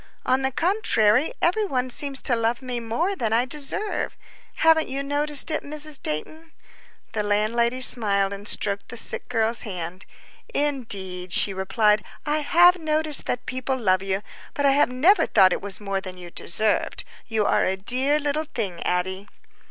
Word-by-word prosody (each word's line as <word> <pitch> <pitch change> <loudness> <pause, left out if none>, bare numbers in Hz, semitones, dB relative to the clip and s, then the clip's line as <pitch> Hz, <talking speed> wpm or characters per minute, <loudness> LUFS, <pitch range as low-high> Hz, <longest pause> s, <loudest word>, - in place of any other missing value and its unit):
On 260 +1 +2
the 265 - +1
contrary, 275 - +1
every 370 +6 +2
one 255 -9 -2
seems 275 +1 -1
to 245 - +2
love 230 +3 -1
me 250 -2 -3
more 275 - -2
than 225 - -2
I 235 +2 +2
deserve. 300 - -2 0.4
Haven't 320 -1 +3
you 275 +1 -3
noticed 290 +2 +1
it, 310 - 0
Mrs. 300 0 0
Dayton?" 315 - -4 0.6
The 215 - -2
landlady 230 +4 0
smiled 200 -6 +3
and 200 +1 -7
stroked 200 -1 -1
the 240 - -5
sick - - -2
girl's 225 +1 +1
hand. 180 -2 -6 0.5
"Indeed," 200 -11 -2
she 195 - +4
replied, 210 +3 +1 0.2
"I 300 0 +1
have 350 +4 +5
noticed 310 -2 -1
that 250 0 -3
people 260 +1 -3
love 190 -6 +1
you, 195 +1 -2 0.3
but 285 - 0
I 275 - +5
have 280 -1 +3
never 305 +12 +3
thought - - -33 0.2
that - - +2
it - - -4
was 200 -1 -1
more 195 -2 -3
than 185 -1 -8
you 175 -1 -11
deserved. 215 +6 0 0.2
You 220 -3 0
are - - +2
a 190 +1 0
dear 260 +9 +1
little 295 +1 -2
thing, 195 -7 -3
Addie." 185 +2 -2
240 Hz, 175 wpm, -23 LUFS, 200-290 Hz, 0.6 s, have